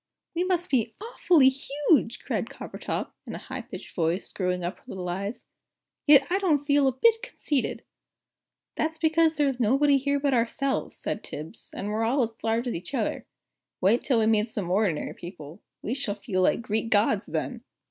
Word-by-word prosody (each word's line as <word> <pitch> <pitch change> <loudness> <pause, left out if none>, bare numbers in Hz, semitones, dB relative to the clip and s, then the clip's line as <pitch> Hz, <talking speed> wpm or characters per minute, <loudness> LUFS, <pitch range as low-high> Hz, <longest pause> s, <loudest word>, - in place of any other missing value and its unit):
"We 345 +1 0
must 360 -1 -1
be 235 -4 +1
awfully 360 - +4
huge!" 275 -2 +1
cried - - -2
Coppertop, - - -5 0.2
in - - -5
a - - -4
high - - -6
pitched - - -10
voice, 170 +2 0
screwing 180 -2 -2
up 175 +2 -3
her - - -28
little 185 -2 -5
eyes. 200 +6 -4 0.6
"Yet 285 -2 +8
I 380 - +3
don't 305 -7 +2
feel 285 -1 +4
a 265 - +2
bit 450 - +3
conceited!" 310 - -2 0.9
"That's 315 +1 -1
because 320 -1 +3
there 295 -1 +3
is 265 -2 -2
nobody 275 +5 +4
here 280 +1 0
but 280 -1 +1
ourselves," 260 +3 0
said - - -4
Tibbs, 155 +2 -8
"and 200 - -4
we're 215 +2 0
all 250 +4 +2
as 225 -1 -6
large 225 +2 +1
as 245 - -2
each 180 +11 -5
other. 225 -5 -2 0.5
Wait 205 +6 +3
till 260 -4 +1
we 220 - +3
meet 220 0 +3
some 195 -5 -3
ordinary 190 -5 +1
people 170 -1 -10 0.2
we 225 - -1
shall 255 -7 -1
feel 200 -2 -2
like 210 - +2
Greek 220 0 -1
gods 210 -1 +2
then!" - - -3
240 Hz, 190 wpm, -27 LUFS, 205-290 Hz, 0.9 s, Yet